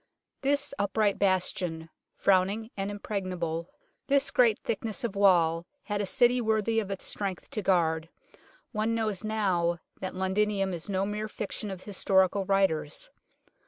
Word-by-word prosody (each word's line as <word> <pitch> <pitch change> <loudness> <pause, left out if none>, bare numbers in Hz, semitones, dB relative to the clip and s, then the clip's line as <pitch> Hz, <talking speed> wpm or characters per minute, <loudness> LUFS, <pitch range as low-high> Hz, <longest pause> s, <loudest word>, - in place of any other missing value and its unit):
This 285 +1 0
upright 205 0 +1
bastion, 180 -4 0 0.3
frowning 200 +4 +2
and 195 0 -2
impregnable, 185 -5 -3 0.4
this 280 0 +3
great 240 -6 +4
thickness 225 +2 -3
of 225 -4 -2
wall, 170 -4 +4 0.2
had 205 -1 -2
a 200 - -2
City 245 +1 +3
worthy 220 0 +1
of 205 -3 -3
its 195 -1 -3
strength 195 -4 -4
to 215 - -2
guard; 165 -4 +1 0.6
one 220 0 0
knows 215 -4 -1
now 185 -6 +1 0.2
that 185 - -5
Londinium 195 +1 +1
is 170 +3 -6
no 195 0 +1
mere 210 +1 -3
fiction 210 0 -4
of 190 -2 -7
historical 190 -1 +2
writers. 195 - 0
200 Hz, 140 wpm, -29 LUFS, 185-215 Hz, 0.6 s, great